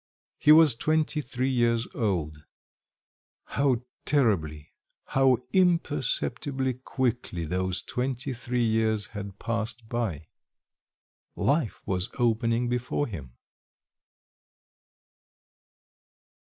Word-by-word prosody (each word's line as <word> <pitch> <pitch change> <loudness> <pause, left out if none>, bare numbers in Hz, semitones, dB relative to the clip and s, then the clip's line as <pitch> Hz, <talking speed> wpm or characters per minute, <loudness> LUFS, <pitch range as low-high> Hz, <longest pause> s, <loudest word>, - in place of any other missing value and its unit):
He 150 - +6
was 155 -3 +8
twenty 155 +5 0
three 130 0 -2
years 120 -2 +2
old; 80 -9 -2 1.0
how 130 -3 0 0.2
terribly, 85 - 0 0.3
how 135 -2 +3 0.2
imperceptibly 140 -6 +1
quickly 120 -8 -2
those 90 +2 -1
twenty 130 +1 -2
three 120 0 -1
years 110 -2 +1
had 100 -2 -6
passed 115 0 -3
by!... 110 -11 -2 1.1
Life 140 -5 0
was 95 +3 -1
opening 115 0 +1
before 125 +4 -1
him. 75 - -8
120 Hz, 85 wpm, -27 LUFS, 105-130 Hz, 1.1 s, was